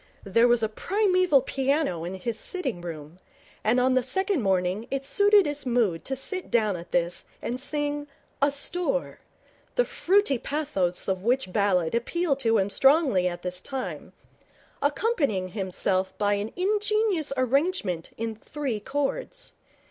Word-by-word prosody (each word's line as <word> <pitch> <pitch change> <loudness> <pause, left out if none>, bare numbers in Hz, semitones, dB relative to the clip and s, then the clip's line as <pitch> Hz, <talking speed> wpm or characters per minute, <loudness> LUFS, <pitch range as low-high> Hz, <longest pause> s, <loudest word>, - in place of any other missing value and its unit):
There 230 +5 +4
was 240 -1 +3
a - - +3
primeval 365 - +2
piano 270 - 0
in 180 +3 -4
his 220 +4 -4
sitting 265 - -3
room, 160 0 -8 0.4
and 230 +4 +3
on 255 +1 +3
the 255 - +3
second 380 - 0
morning 190 +2 0
it 275 0 -3
suited 405 +7 +5
his 290 0 -2
mood 235 -9 +1
to 265 - -2
sit 370 +8 -3
down 215 -4 +2
at 175 0 -9
this 175 0 0
and 245 +2 -3
sing 290 +1 -2 0.3
'Asthore', 345 - 0 0.6
the - - +3
fruity 380 - +2
pathos 225 - -1
of 190 -1 -1
which 240 -4 0
ballad 185 -5 +2
appealed 280 +5 0
to 225 -4 +2
him 200 0 0
strongly 270 - +4
at 175 -1 -5
this 180 0 -4
time, 265 +3 -6 0.7
accompanying 285 - 0
himself 190 -1 -1
by 205 0 +2
an 205 +2 -2
ingenious 415 -3 +1
arrangement 255 - 0
in 225 0 -3
three 260 0 -4
chords. 290 - -3
255 Hz, 145 wpm, -26 LUFS, 195-300 Hz, 0.7 s, suited